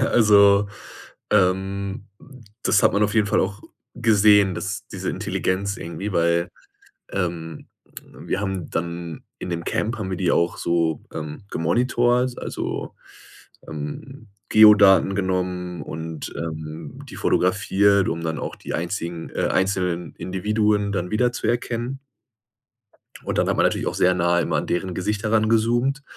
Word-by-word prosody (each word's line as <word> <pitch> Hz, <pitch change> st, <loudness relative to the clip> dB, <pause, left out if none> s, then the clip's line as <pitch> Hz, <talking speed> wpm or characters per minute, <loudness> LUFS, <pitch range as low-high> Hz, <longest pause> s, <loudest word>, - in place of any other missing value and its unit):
also, 105 Hz, -5 st, +5 dB, 0.6 s
ähm, 100 Hz, 0 st, 0 dB, 0.6 s
das 100 Hz, -, +3 dB
hat -, -, +4 dB
man 100 Hz, -, +2 dB
auf 105 Hz, 0 st, +1 dB
jeden 110 Hz, -2 st, +3 dB
Fall 105 Hz, +2 st, +2 dB
auch 100 Hz, +3 st, -3 dB, 0.3 s
gesehen, 105 Hz, -4 st, +4 dB
dass 105 Hz, +6 st, -5 dB
diese 95 Hz, -4 st, -5 dB
Intelligenz 100 Hz, +2 st, -2 dB
irgendwie, 95 Hz, +5 st, -5 dB
weil, 85 Hz, 0 st, +1 dB, 0.6 s
ähm, 85 Hz, -3 st, -4 dB, 0.4 s
wir 95 Hz, -, -5 dB
haben 95 Hz, -4 st, -4 dB
dann 85 Hz, -1 st, -4 dB, 0.2 s
in -, -, -6 dB
dem 85 Hz, -1 st, -3 dB
Camp 115 Hz, +2 st, -2 dB
haben 100 Hz, -3 st, -4 dB
wir 95 Hz, -, -2 dB
die 90 Hz, -2 st, +1 dB
auch 85 Hz, 0 st, +1 dB
so, 85 Hz, -2 st, 0 dB
ähm, 75 Hz, +1 st, -6 dB
gemonitort, 120 Hz, +7 st, +1 dB
also, -, -, -5 dB, 0.7 s
ähm, 75 Hz, +3 st, -7 dB, 0.2 s
Geodaten 100 Hz, -3 st, +7 dB
genommen 90 Hz, -2 st, -2 dB
und, 80 Hz, -1 st, -6 dB
ähm, 80 Hz, -1 st, -6 dB
die -, -, -9 dB
fotografiert, 100 Hz, +1 st, +2 dB
um 85 Hz, 0 st, -3 dB
dann 80 Hz, -1 st, -2 dB
auch -, -, -5 dB
die -, -, -8 dB
einzigen 85 Hz, -1 st, -4 dB
äh, -, -, -1 dB
einzelnen 90 Hz, -2 st, -1 dB
Individuen 105 Hz, +2 st, 0 dB
dann 90 Hz, -2 st, -2 dB
wiederzuerkennen. 120 Hz, +2 st, -1 dB, 1.2 s
Und -, -, -2 dB
dann -, -, +2 dB
hat -, -, +1 dB
man -, -, +3 dB
natürlich -, -, 0 dB
auch -, -, -1 dB
sehr 90 Hz, 0 st, +3 dB
nahe 85 Hz, -1 st, +2 dB
immer -, -, -1 dB
an -, -, -2 dB
deren 90 Hz, +1 st, -2 dB
Gesicht 105 Hz, +4 st, -2 dB
herangezoomt, 115 Hz, +5 st, +1 dB
95 Hz, 140 wpm, -23 LUFS, 85-105 Hz, 1.2 s, Geodaten